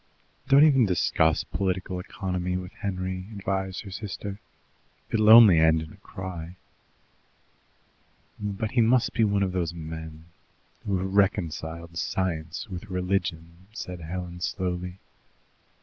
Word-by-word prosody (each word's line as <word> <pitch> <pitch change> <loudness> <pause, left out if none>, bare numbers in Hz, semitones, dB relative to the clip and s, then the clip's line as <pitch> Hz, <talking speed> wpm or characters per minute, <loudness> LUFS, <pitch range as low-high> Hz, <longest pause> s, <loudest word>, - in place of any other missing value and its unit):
"Don't 140 +1 +7
even 135 -7 +5
discuss 80 -3 +2
political 95 -1 -2
economy 90 -1 -3
with 90 0 -7
Henry," 95 -1 -4
advised 95 -1 -2
her 100 - -9
sister. 100 0 -6 0.7
"It'll 110 -1 +3
only 110 -7 +10
end 80 0 +5
in 80 0 -8
a - - -16
cry." 90 -2 -7 1.8
"But 105 +1 -3
he 125 -2 +3
must 115 +2 +3
be 115 - +2
one 100 -2 +2
of 95 - -1
those 85 -2 -2
men 80 -1 -8 0.6
who 100 -2 +1
have 95 +1 -3
reconciled 85 -4 0
science 85 -1 -2
with 95 +1 -8
religion," 90 -2 -2
said 90 -6 -6
Helen 90 +1 -6
slowly. 90 -1 -3
95 Hz, 125 wpm, -26 LUFS, 85-100 Hz, 1.8 s, only